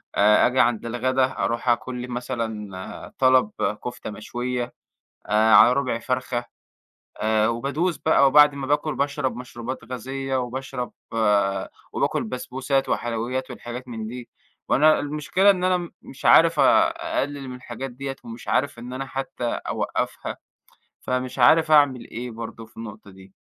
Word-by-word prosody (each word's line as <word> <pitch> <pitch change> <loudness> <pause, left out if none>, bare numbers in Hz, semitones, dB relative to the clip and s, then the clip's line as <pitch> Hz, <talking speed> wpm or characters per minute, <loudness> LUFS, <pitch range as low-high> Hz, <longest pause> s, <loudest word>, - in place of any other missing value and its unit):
آآ، 105 +1 +5
آجي 125 +1 0
عند 120 0 +2
الغدا 130 +3 +1
أروح 120 +1 -1
آكل 125 +1 0
لي 125 - -6
مثلًا 110 -6 -5
طلب 130 -5 +4 0.3
كفتة 125 -2 -5
مشوية، 120 +3 -4 0.5
آآ 110 +1 +4
على 120 - +8
ربع 125 -3 0
فرخة، 125 -1 -2 0.7
آآ 110 0 +2
وبادوس 140 +9 -1
بقى 140 -3 +4
وبعد 145 +1 +6
ما 140 -1 -5
باكل 145 +1 0
باشرب 140 -2 -1
مشروبات 125 0 -7
غازية 135 +2 -3
وباشرب 125 0 -4 1.0
وباكل - - 0
بسبوسات 130 +3 -2
وحلويات 120 +3 -2
والحاجات 125 +2 -7
من 110 -2 -5
دي، 120 +1 -8 0.4
وأنا 155 +2 +5
المشكلة 150 +7 +2
إن 185 -2 +1
أنا 185 0 +3
م 175 -1 -5
مش 135 - -13
عارف 165 -2 +6
آآ 330 0 +5 0.3
أقلّل 140 -2 -4
من 125 - -6
الحاجات 125 +1 -7
ديّة 135 +2 -6
ومش 115 0 -10
عارف 140 -3 0
إن 125 +2 -8
أنا 135 +1 -4
حتّى 135 -2 -5
أوقّفها، 120 - -3 0.6
فمش 130 +1 -3
عارف 155 +6 +5
أعمل 145 -5 +4
إيه 120 +1 -6
برضه 115 0 -8
في 110 - -27
النقطة 110 -2 -9
دي. 95 0 -16
125 Hz, 145 wpm, -24 LUFS, 120-135 Hz, 1.0 s, على